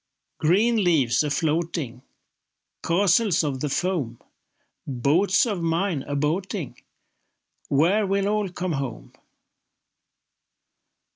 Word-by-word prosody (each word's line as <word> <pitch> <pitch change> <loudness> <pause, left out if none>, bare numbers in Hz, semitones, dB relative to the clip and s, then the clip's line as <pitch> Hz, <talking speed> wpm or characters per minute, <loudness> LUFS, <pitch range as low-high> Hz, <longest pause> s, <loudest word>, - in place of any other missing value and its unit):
Green 210 +7 +3
leaves 145 -10 +3
a 150 - -1
floating, 155 -4 -2 0.8
Castles 190 +1 +2
of 140 -3 -2
the 150 - -2
foam, 140 -8 -2 0.7
Boats 150 - +2
of 205 -7 -2
mine 165 -1 0
a 145 - -3
boating— 165 - -2 0.9
Where 185 +9 +3
will 195 +1 0
all 210 -1 0
come 180 0 -4
home? 135 -6 -5
170 Hz, 95 wpm, -24 LUFS, 145-195 Hz, 0.9 s, Green